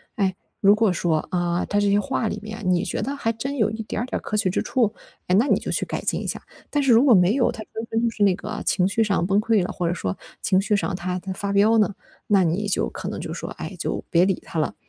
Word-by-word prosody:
哎， 190 -5 0 0.2
如 200 +1 +6
果 215 -2 +3
说， 170 -3 +1
啊， 175 -1 0
他 205 - 0
这 205 0 +2
些 200 - +4
话 255 -1 -1
里 210 - -3
面， 220 +1 -7
你 180 0 +2
觉 - - -3
得 270 +7 -2
还 230 -5 -1
真 260 +5 -4
有 215 -3 +2
一 220 +1 -5
点 215 - -4
儿 - - -1
点 255 - -3
儿 - - -16
可 215 - -4
取 195 -3 +2
之 - - 0
处， 230 -5 +1 0.3
哎， 180 - +3
那 245 - +2
你 - - +4
就 - - -4
去 - - 0
改 - - -4
进 - - -1
一 - - -5
下。 - - -3 0.3
但 290 -1 0
是 270 - +3
如 230 +2 +6
果 260 - +7
没 180 +2 +4
有， 245 -3 +3
他 225 -2 -7
真 225 - -4
的 225 +1 0
就 - - +2
是 205 -1 0
那 190 -3 +4
个 215 +2 -6
情 180 - +2
绪 195 +4 0
上 200 -5 +1
崩 195 +2 +2
溃 215 -2 +2
了， - - -4
或 175 -2 -2
者 170 - +1
说 95 - -3 0.2
情 190 -1 +3
绪 210 +2 +1
上 200 -1 -1
他 180 0 -3
他 190 +1 -6
发 200 +1 -3
飙 210 +3 +4
呢， 210 -2 +2 0.3
那 200 -3 +4
你 180 +5 0
就 200 - 0
可 - - -7
能 - - -4
就 - - -5
说， - - -6
哎， - - -7
就 - - -2
别 175 +1 +4
理 190 -1 +1
他 165 - -3
了。 155 - -1
205 Hz, 315 characters per minute, -23 LUFS, 185-225 Hz, 0.3 s, 果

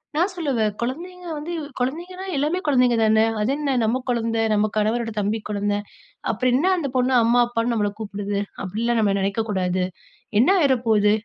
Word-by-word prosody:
நான் 350 +5 +2
சொல்லுவேன், 260 -11 0
"குழந்தைங்க 350 +8 -5
வந்து 305 +4 -5 0.3
குழந்தைங்கன்னா 345 +9 -3
எல்லாமே 305 +6 0
குழந்தைங்க 250 -4 +4
தானே! 220 0 +4 0.2
அது 215 +5 +1
என்ன 285 -3 0
நம்ம 235 +4 +1
குழந்தை, 230 -2 0
நம்ம 215 0 +2
கணவரோட 225 +2 0
தம்பி 210 +2 0
குழந்தை, 205 0 0 0.6
அப்பறோம் 250 +3 +1
என்னா 355 +7 +2
அந்த 295 -5 -2
பொண்ணு 255 +1 +2
அம்மா, 235 +2 +3
அப்பான்னு 235 0 -1
நம்மள 210 -2 +1
கூப்பிடுது 205 -1 -3 0.3
அப்டிலாம் 230 +5 -1
நம்ம 205 -2 +2
நினைக்க 195 +3 0
கூடாது. 185 -2 0 0.6
என்ன 250 - +5
ஆயிர 280 -4 +4
போது, 210 -2 +4
235 Hz, 165 wpm, -23 LUFS, 210-275 Hz, 0.6 s, என்ன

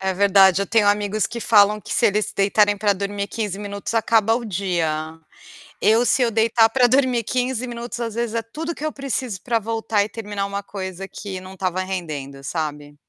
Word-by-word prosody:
É 190 0 0
verdade, 195 -1 +5
eu 200 - -1
tenho 215 -1 +3
amigos 205 +1 +1
que 235 - -7
falam 210 -1 +4
que - - -7
se - - +1
eles 210 +1 0
deitarem 205 +1 +3
para 205 0 +2
dormir 200 +1 -3
15 205 -4 -3
minutos 200 +1 -5
acaba 225 -1 +3
o 240 - -3
dia. 165 -5 -2 0.6
Eu 225 +3 +4
se 255 +2 +3
eu 240 - +3
deitar 225 0 +3
para 250 +2 +3
dormir 255 -2 +2
15 250 +1 -1
minutos 240 0 -6
às 230 -2 -3
vezes 235 -1 -2
é 230 - +1
tudo 315 +9 -6
que 305 - -6
eu 310 - -1
preciso 255 -8 -4
para 235 -2 0
voltar 225 -1 0
e 210 - -5
terminar 205 -2 -4
coisa 195 -1 -6
que 195 -2 -7
não 185 +1 -11
estava 185 -1 -2
rendendo, 150 -8 -5
sabe. 150 -2 -4
205 Hz, 195 wpm, -22 LUFS, 190-230 Hz, 0.6 s, verdade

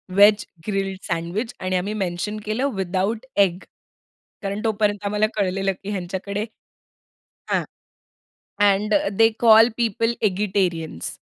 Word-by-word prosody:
veg 205 +2 +6 0.2
grilled 195 -2 -1
sandwich 175 +7 -2
आणि 185 0 -1
आम्ही 200 +4 -2
mention 195 +1 -3
केलं 245 +6 0
विथआऊट 195 +5 -1
एग 185 -3 +4 0.8
कारण 200 +1 -3
तोपर्यंत 205 -1 0
आम्हाला 210 +1 +2
कळलेलं, 195 -1 0
की 200 - -5
ह्यांच्याकडे 195 +2 -3 1.1
हां, - - +2 1.1
and 210 +2 +1 0.2
they 225 0 +7
call 225 0 +7
people 230 0 0
eggetarians 185 - -1
200 Hz, 110 wpm, -22 LUFS, 185-215 Hz, 1.1 s, they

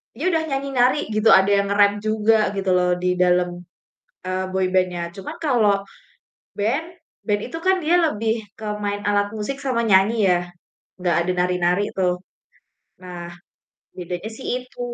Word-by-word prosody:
dia 315 +10 0
udah 325 -3 +1
nyanyi, 275 -2 -3
nari, 250 +4 +4
gitu, 215 +1 +2
ada 190 +1 +5
yang 200 0 +3
nge-rap 205 0 +5
juga 215 +1 +2 0.2
gitu 195 -1 -2
loh 180 0 +2
di 180 0 0
dalem, 180 0 +3 0.8
eee, 185 0 -1
boyband-nya, 185 -2 0
cuman 195 - -7
kalau 225 -10 +2 0.7
band, 245 +11 -1 0.4
band 205 -2 0
itu 325 - -6
kan 370 +2 +1
dia 335 +3 +3
lebih 225 -9 0
ke 220 - -10 0.2
main 205 0 -2
alat 205 0 +1
musik 220 +5 -4
sama 260 -4 -1
nyanyi 200 +1 +4
ya, 180 - +4 0.7
gak 175 -2 +2
ada 180 - -1
nari-nari 180 +1 +1
tuh. 180 -1 -1 0.7
Nah, 175 -2 -8 0.7
bedanya 180 +2 -6
sih - - -9 0.2
itu. 250 - -16
205 Hz, 155 wpm, -22 LUFS, 180-230 Hz, 0.8 s, ada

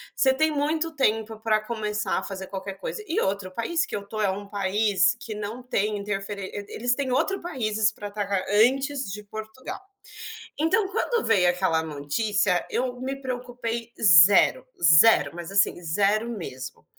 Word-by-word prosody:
você 265 -1 +3
tem 315 +4 +2
muito 310 +3 -1
tempo 220 -4 0
para 220 -1 +2
começar 210 -3 -2
a - - -8
fazer 190 -1 -6
qualquer 195 +1 -6
coisa. 195 - -6
E 330 - 0
outro, 195 -1 -2
o - - -21
país 330 - -1
que - - -6
eu 205 - -3
estou 215 +2 -6
é 205 - +2
um 200 +2 -4
país 200 0 +1
que 220 - -6
não 215 +4 -6
tem 210 -4 -1
interferên 200 -1 -4
Eh, 205 0 -5
eles 245 +2 0
têm 270 -2 -2
outro 390 +9 0
países 220 -9 0
para 205 - -7
atacar 200 -2 -2
antes 265 +4 +2
de 210 +1 -7
Portugal. 220 - -8 0.8
Então, 370 +6 +2
quando 460 +2 -1
veio 180 -2 +4
aquela 175 -3 +1
notícia, 175 +6 0
eu 250 0 -2
me 270 +1 -3
preocupei 245 -2 -4
0, 200 +6 +6 0.2
0, 165 +7 +6
mas, 175 +1 -7
assim, 195 -2 +2
0 205 +7 +1
mesmo. 135 - -7
215 Hz, 170 wpm, -25 LUFS, 195-250 Hz, 0.8 s, 0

